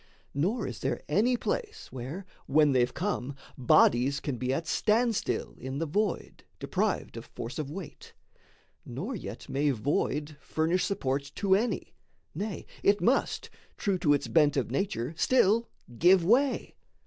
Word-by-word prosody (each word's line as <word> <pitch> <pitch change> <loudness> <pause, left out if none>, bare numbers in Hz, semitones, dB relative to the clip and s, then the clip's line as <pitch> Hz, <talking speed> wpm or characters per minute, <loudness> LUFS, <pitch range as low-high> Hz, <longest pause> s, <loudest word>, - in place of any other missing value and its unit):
Nor 195 - 0
is - - -6
there - - -2
any 230 +10 +2
place, 440 - -3
where, 135 +10 -6 0.2
when 150 +1 +4
they've 125 -1 +2
come, 140 -8 -3 0.2
Bodies 130 +1 +4
can 140 -4 -3
be 125 +2 -1
at 160 +5 -1
standstill 225 +6 +1
in 130 +1 -5
the 165 - -1
void, 200 +5 -2
Deprived - - -1
of - - -7
force 120 +6 -6
of 150 -3 -3
weight; 175 +1 -9 0.7
nor - - -5
yet - - -7
may 145 +2 +1
void 145 +4 -1
Furnish 165 +3 0
support 140 -7 -2
to 195 -2 +2
any, 220 +5 0 0.4
nay, 205 0 -4 0.2
it 200 +1 +4
must, 255 +4 +1 0.3
True 195 -3 0
to 145 -4 +4
its - - -3
bent 150 -3 +3
of 125 -3 -1
nature, 135 - -2
still 230 -1 +3 0.3
give 180 0 +6
way. 260 +8 +2
160 Hz, 150 wpm, -29 LUFS, 140-205 Hz, 0.7 s, give